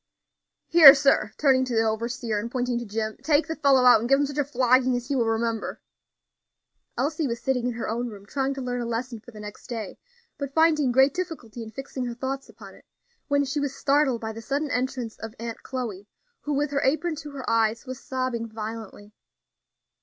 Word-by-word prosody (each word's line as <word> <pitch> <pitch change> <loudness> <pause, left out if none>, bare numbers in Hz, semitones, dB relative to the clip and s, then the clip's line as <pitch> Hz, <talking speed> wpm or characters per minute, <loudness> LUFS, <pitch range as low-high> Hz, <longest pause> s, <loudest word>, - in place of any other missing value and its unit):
"Here, 310 -5 +10
sir," 275 -7 +2
turning 265 -3 +4
to 250 -2 -3
the 225 - +3
overseer, 225 0 -2
and 230 +3 -4
pointing 245 -1 -1
to 240 - -7
Jim, 215 +1 -3
"take 305 0 +2
the 320 - -4
fellow 275 -4 +4
out, 245 -3 +8
and 235 +3 -3
give 275 0 +5
him 285 - +2
such 285 +1 -4
a - - +3
flogging 255 -1 +2
as 245 0 -4
he 280 - 0
will 235 -3 +1
remember." 225 0 -2 1.2
Elsie 300 +4 0
was 235 -1 -3
sitting 250 -2 0
in 245 - -1
her 230 - -4
own 240 +2 -2
room, 200 -2 -11
trying 270 +5 -2
to 270 - -5
learn 245 0 -2
a - - -3
lesson 235 0 -3
for 230 - -15
the 220 -3 -12
next 210 0 -10
day, 225 -5 -6 0.4
but 280 -1 -5
finding 310 -5 +4
great 265 +3 +4
difficulty 305 -11 -5
in 225 - -7
fixing 265 +1 -6
her 240 -1 -4
thoughts 270 +2 -4
upon - - -13
it, - - -19 0.4
when 285 -1 +2
she 280 +2 -2
was 285 -1 -2
startled 275 -4 +2
by 220 0 -4
the 225 - -8
sudden 285 +5 -2
entrance 250 -2 -2
of 225 +1 -8
Aunt 230 0 -6
Chloe, 220 -7 -5 0.3
who, 295 - -3
with 290 +1 0
her 280 -1 0
apron 315 +4 +1
to 295 0 -7
her 270 -2 -7
eyes, 225 +1 +1
was 255 -1 -7
sobbing 255 -3 -2
violently. 215 -1 -8
250 Hz, 215 wpm, -25 LUFS, 230-275 Hz, 1.2 s, Here